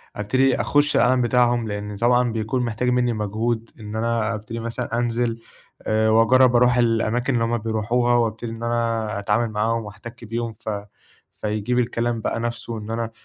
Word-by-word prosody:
أبتدي 130 +6 +1
أخُش 145 0 +2
العالم 125 0 +4
بتاعهم 120 -1 +2
لإن 105 0 -5
طبعًا 120 +2 +2
بيكون 115 +3 -1
محتاج 120 +2 -1
منّي 125 -1 +2
مجهود 110 +2 -2
إن 105 0 -7
أنا 115 0 0
أبتدي 110 +2 -6
مثلًا 115 0 -3
أنزِل 120 -1 0 0.5
آآ 110 0 +2
وأجرّب 125 +3 +5
أرُوح 125 0 +4
الأماكن 120 +2 +1
اللي 115 -1 +1
هُم 120 +1 0
بيرُوحوها 115 +2 +1
وأبتدي 115 0 -1
إن 115 +1 -7
أنا 115 -3 -1
أتعامل 105 +3 0
معاهم 110 +1 0
وأحتكّ 105 +3 -10
بيهم 115 +1 -3
ف 110 - -8 0.7
فيجيب 110 +4 0
الكلام 115 -1 -1
بقى - - -2
نَفْسه 120 0 -4
إن 105 +1 -7
أنا 115 0 -2
115 Hz, 165 wpm, -22 LUFS, 110-120 Hz, 0.7 s, وأجرّب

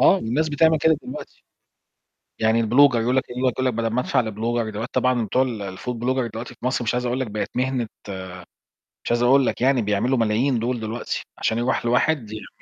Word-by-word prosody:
آه، - - +7
والناس 155 +1 -1
بتعمل 160 +2 +3
كده 160 0 +3
دلوقتي. 125 - -9 1.0
يعني 110 +1 +3
الblogger 125 +4 +5
يقول 120 +3 +1
لك - - +3
يقول 130 +1 -1
لك 125 - 0
بدل 115 0 -1
ما 120 +3 0
أدفع 125 0 +1
لblogger 110 +1 -2
دلوقتي 110 +4 -5
طبعًا 125 -2 +2
بتوع 130 +6 +2 0.3
الfood 125 +6 -4
blogger 125 0 -1
دلوقتي 120 +2 -6
في 120 - -9
مصر 125 -1 0
مش 115 - 0
عايز 125 0 -1
أقول 125 +2 -1
لك 130 - -2
بقِت 105 0 -3
مهنة 130 -2 0 1.2
مش - - -3
عايز 120 0 +2
أقول 135 +1 +5
لك - - -2
يعني 130 -1 +3
بيعملوا 105 +5 +1
ملايين 115 +3 +1
دُول 120 +1 -1
دلوقتي، 110 +2 -4 0.2
عشان 110 - 0
يرُوح 120 0 0
لواحد 125 -1 +1
يعمل 110 - -7
120 Hz, 200 wpm, -23 LUFS, 115-130 Hz, 1.2 s, آه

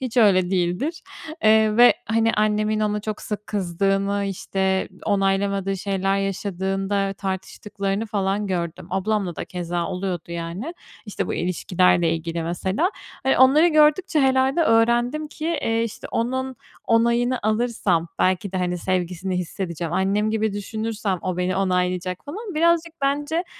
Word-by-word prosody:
hiç 255 -2 -5
öyle 190 -6 +4
değildir, 190 - -1 0.4
eee, 215 0 +5
ve, 245 +1 +7
hani, 225 0 +2
annemin 215 0 +1
ona 210 0 0
çok 215 0 -5
sık 210 -1 -5
kızdığını, 195 +1 0
işte 190 0 -1 0.2
onaylamadığı 195 -1 +1
şeyler 195 0 0
yaşadığında 195 0 -1
tartıştıklarını 195 +2 -3
falan 200 0 -1
gördüm. 170 -3 -3
Ablamla 190 -2 -1
da - - -4
keza 175 -1 -3
oluyordu, 180 -2 -4
yani. 170 - -5 0.3
İşte 210 - -3
bu - - -2
ilişkilerle 175 -1 +2
ilgili, 165 0 -3
mesela. 190 - -1 0.3
E, 265 - +3
onları 285 +6 +6
gördükçe 305 +2 +3
herhâlde 265 +4 +3
öğrendim 240 +5 +2
ki, 320 +3 -3
iii, 225 0 +1
işte 230 - -7
onun 260 +2 -1 0.3
onayını 235 +2 +2
alırsam 215 -6 0
belki 185 +1 +1
de, 190 - -1
hani, 180 -1 -1
sevgisini 185 +1 -2
hissedeceğim. 170 -2 -4
Annem 200 +4 +1
gibi 220 -1 0
düşünürsem 210 -1 -3
o 185 -1 -2
beni 180 +1 0
onaylayacak, 180 0 -1
falan. 390 +6 -7
Birazcık 335 +1 +2
bence 295 +5 0
200 Hz, 135 wpm, -23 LUFS, 185-230 Hz, 0.4 s, ve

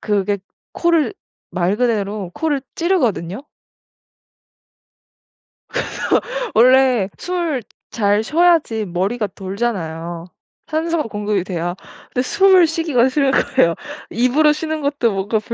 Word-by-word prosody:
그게 205 -1 0 0.3
코를 340 +1 +2 0.4
말 185 +3 0
그대로 210 -5 -1
코를 300 -4 -1 0.2
찌르거든요. 255 - 0 2.3
그래서 - - -3 0.7
원래 250 -4 +5
숨 345 -7 -2 0.3
잘 205 -1 +2
쉬어야지 310 -7 +2
머리가 195 +5 -1
돌잖아요. 175 -5 -4 0.4
산소가 325 0 -1
공급이 205 -2 -1
돼야 175 -1 -3 0.4
근데 250 - +1
숨을 380 +2 +5
쉬기가 310 -6 +1
싫은 275 0 +2
거예요. 170 -12 +2 0.4
입으로 275 +6 +3
쉬는 315 0 -3
것도 280 -5 +1
뭔가 200 +3 -1
240 Hz, 240 characters per minute, -19 LUFS, 200-305 Hz, 2.3 s, 원래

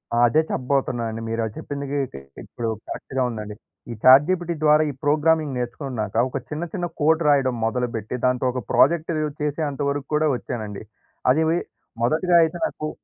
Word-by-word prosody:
ఆ! - - +1
అదే 155 +7 +3
చెప్పబోతున్నానండి. 120 -4 -1
మీరు 115 0 -1
అది 110 - -6
చెప్పిందికి 140 0 -4 0.5
ఇప్పుడు 115 -1 -4 0.2
కరెక్ట్‌గా 130 -1 -3
ఉందండి. 105 -2 -6 0.4
ఈ - - -3
చాట్ 130 +3 +8
జీపీటీ 175 -2 0
ద్వారా 150 0 +5
ఈ - - -11
ప్రోగ్రామింగ్ 150 -1 +2
నేర్చుకున్నాక, 120 -4 -4
ఒక - - -3
చిన్న 150 +2 -4
చిన్న 175 -3 -2 0.2
కోడ్ 160 +2 +3
రాయడం 135 -3 +3
మొదలుపెట్టి, 115 -1 -2
దాంతో 125 0 +1
ఒక 125 - -3
ప్రాజెక్ట్ 165 +3 +3 0.3
చేసేంత 150 -1 -2
వరకు 140 -1 -3
కూడా 155 +1 +2
వచ్చానండి. 110 -5 -6 0.5
అదీ 155 +5 +3 0.6
మొదటిగా 160 +8 +2
అయితే 165 +2 -1
నాకు 155 - -4
140 Hz, 150 wpm, -23 LUFS, 120-155 Hz, 0.6 s, చాట్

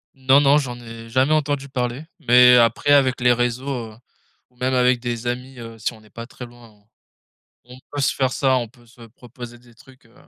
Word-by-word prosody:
Non, 135 +1 +3
non, 145 +1 +4
j'en 125 -3 -6
ai 115 -1 -11
jamais 130 +5 +1
entendu 145 -2 -1
parler 125 +3 -4
mais 125 -3 +6
après 120 +5 +2
avec 135 -3 +3
les 125 0 +3
réseaux, 120 +2 -2 0.3
heu, - - -19 0.5
ou 125 - -33
même 130 +1 -1
avec 125 -1 +2
des 120 -1 -5
amis, 125 +2 -5
heu, 115 -1 -10
si 105 - -2
on 110 - -17
n'est 105 - -22
pas 115 0 -9
très 125 - -10
loin 120 -1 -17
on 105 -1 -27 0.9
on 125 - -12
peut 145 - -3
se 135 - 0
faire 130 -1 0
ça, 130 -2 +1
on 120 -2 -3
peut 120 0 -24
se 120 +1 -20
proposer 120 +1 -13
des 120 -1 -22
trucs, 130 +2 -20
heu, 115 - -26
125 Hz, 220 wpm, -21 LUFS, 120-130 Hz, 0.9 s, mais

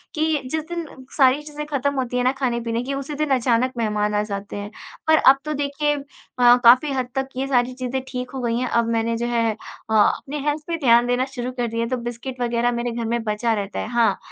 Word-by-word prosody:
कि 310 -1 +1
जिस 315 -1 -1
दिन 340 -1 -3 0.3
सारी 270 +1 +5
चीज़ें 300 0 -7
ख़त्म 280 -1 -1
होती 250 -2 -2
है 245 - +1
ना 255 - +3
ख़ाने-पीने 235 -2 -1
की 275 +2 -3
उसी 275 +2 -4
दिन 305 0 -1
अचानक 250 0 +1
मेहमान 210 -2 0
आ 210 - +2
जाते 200 -1 -6
हैं। 205 0 -5 0.4
पर 315 0 +6
अब 270 -1 +6
तो 305 - -2
देखिए 290 +1 0
अ, 280 - -6 0.6
काफ़ी 250 +5 +6
हद 260 -2 -1
तक 270 0 -1
ये 270 - -1
सारी 250 -1 +1
चीज़ें 255 +1 -3
ठीक 250 0 -5
हो 265 - -5
गई 235 -1 0
हैं 250 +1 -1
अब 235 -1 +1
मैंने 230 0 0
जो 235 - -2
है 230 -2 +1
अ, 220 +1 -9
अपने 275 +7 +2
हेल्थ 295 +1 0
पे 335 - -1
ध्यान 240 -5 +4
देना 245 +1 +1
शुरू 255 -2 -5
कर 245 -2 -2
दिया 230 +1 -2
है। 230 - -3
तो 255 - -1
बिस्किट 240 +2 -6
वग़ैरह 240 0 +1
मेरे 240 0 -2
घर 235 0 -3
में 235 0 -1
बचा 220 +2 0
रहता 205 -2 -3
है - - -3
हाँ 230 -5 +2
245 Hz, 240 wpm, -22 LUFS, 230-275 Hz, 0.6 s, पर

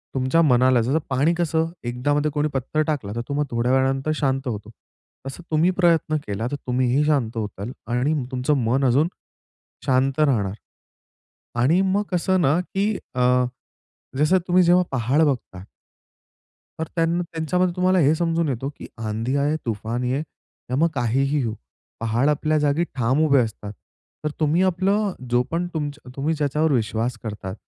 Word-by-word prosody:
तुमच्या 130 +6 +2
मनाला 130 -4 +4
जसं 130 +7 +1
पाणी 140 +6 +2
कसं 165 -1 0
एकदा 125 +4 -1
मध्ये 150 +1 +1
कोणी 150 +1 0
पत्थर 135 +4 -1
टाकला 130 -10 -2
तर 120 - -2
तो - - -2
मग 145 +1 +1
थोड्या 120 +2 0
वेळानंतर 135 +3 +1
शांत 135 -2 -1
होतो. 105 -3 -4 0.6
तसं 150 +6 -8
तुम्ही 165 +4 +3
प्रयत्न 165 -3 +3
केला 100 +3 -3
तर - - -1
तुम्हीही 130 +3 +2
शांत 125 -7 0
होताल 105 +1 -4 0.2
आणि 125 +6 +1 0.2
तुमचं 130 +4 0
मन 130 +4 +1
अजून 140 +6 +3 0.8
शांत 135 +2 +1
राहणार. 115 -10 +2 1.1
आणि 165 +9 +4
मग 195 +2 +1
कसं 185 +1 +1
ना 150 +1 +3
की 195 +2 -2 0.3
अ, 125 0 +3 0.7
जसं 155 +6 +4
तुम्ही 180 0 +4
जेव्हा 175 +1 +5
पहाड 135 +4 +1
बघता 105 -9 -3 1.2
तर 160 - 0
त्यांना, 165 +1 +1
त्यांच्यामध्ये 175 +3 0
तुम्हाला 185 +1 +3
हे 150 -1 +4
समजून 165 -1 0
येतो 135 +1 -2
की - - -8
आँधी 115 +4 -2
आये, 145 +2 +1
तूफान 115 +2 -2
ये, 130 +3 0 0.5
त्यामुळे 155 +6 +2
काहीही 135 +4 +1
होऊ, 110 - -2 0.5
पहाड, 115 +4 +1
आपल्या 155 +1 +1
जागी 150 +3 +1
ठाम 130 +3 +1
उभे 140 -3 +4
असतात. 105 -2 -6 0.5
तर 150 - 0
तुम्ही 155 +4 +2
आपलं 190 +2 +1 0.2
जो 120 0 +3
पण 170 +2 -1
तुमच 145 -2 -3 0.2
तुम्ही 150 +4 0
ज्याच्यावर 150 +1 +1
विश्वास 115 0 0
करतात 105 -4 -6
140 Hz, 160 wpm, -23 LUFS, 125-160 Hz, 1.2 s, जेव्हा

